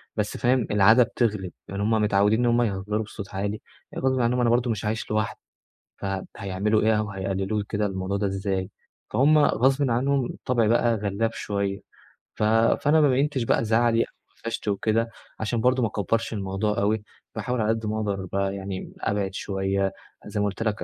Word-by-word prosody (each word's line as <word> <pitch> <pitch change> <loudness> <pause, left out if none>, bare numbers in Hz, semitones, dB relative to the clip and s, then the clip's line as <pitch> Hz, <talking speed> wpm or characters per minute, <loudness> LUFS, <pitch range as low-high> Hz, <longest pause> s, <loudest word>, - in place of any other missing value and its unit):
بس 105 -1 -2
فاهم، 125 -2 +2
العادة 105 +4 +6
بتغلب. 105 -6 -1 0.2
يعني 100 +1 -4
هم 105 - +1
متعوّدين 105 0 +3
إن 125 - +2
هم 120 0 +3
يهزّروا 105 0 -1
بصوت 100 -2 -9
عالي، 100 +2 -2 0.3
يعني - - -5
برضو 130 0 +2
ما 125 - +2 0.2
أنا 120 - +3
برضه 120 +1 +2
مش 105 -2 -3
عايش 110 +1 -2
لوحدي، 110 0 -1 0.6
فهيعملوا 100 +2 -1
إيه 110 0 +3
أو 105 -1 -2
هيقلِّلوا 95 +2 -2
كده 105 -1 0
الموضوع 95 0 -2
ده 100 0 0
إزاي؟ 95 -1 -2 0.4
فهم 150 +4 +4
غصبٍ 135 -1 +3
عنهم 135 +2 +1
الطبع 120 -3 0
بقى 120 +1 +3
غلّاب 105 +2 -1
شوية، 100 -2 -2 0.6
ف - - -2
فأنا 115 +8 +4
ما 145 - +5
بيّنتش 135 0 +1
بقى 115 - +1
زعلي 115 +1 +3
أو - - +1 0.4
أفشت 115 -1 -4
وكده 110 +3 +1 0.3
عشان 110 +1 -1
برضه 125 +2 +3
ما - - +3
أكبّرش 110 +3 -1
الموضوع 100 +1 -1
أوي. 105 +1 +1 0.3
باحاول 120 +2 -1
على 105 - +1
قد 115 0 0
ما 105 0 -1
أقدر 100 -3 -2
بقى 100 0 0
يعني 95 -1 -6
أبعِد 100 -2 -1
شوية، 95 0 -1 0.3
زي 105 0 -4
ما 105 - +2
قُلت 100 +2 -2
لك 110 -1 -1
105 Hz, 180 wpm, -25 LUFS, 100-115 Hz, 0.6 s, العادة